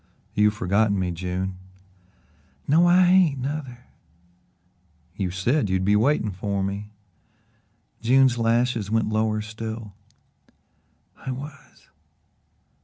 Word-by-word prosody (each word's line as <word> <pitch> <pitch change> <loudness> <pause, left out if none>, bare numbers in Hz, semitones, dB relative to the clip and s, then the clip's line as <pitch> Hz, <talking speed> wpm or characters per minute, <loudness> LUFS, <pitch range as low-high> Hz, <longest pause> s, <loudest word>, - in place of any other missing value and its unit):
"You've 105 0 +3
forgotten 100 +2 +1
me, 90 -2 -1
June." 90 +2 -4 1.1
"No, 165 +5 +4
I 180 +1 +5
hain't, 180 -6 +4
nuther." 130 -2 -5 1.3
"You 95 -3 -2
said 105 - 0
you'd 95 0 0
be 105 +1 +3
waiting 110 -1 +2
for 100 +1 -3
me." 100 +2 -4 1.1
June's 130 +1 +4
lashes 115 -2 +1
went 110 0 +1
lower 110 0 0
still. 110 0 -7 1.2
"I - - -8
was." 140 +2 -9
110 Hz, 105 wpm, -24 LUFS, 100-130 Hz, 1.3 s, I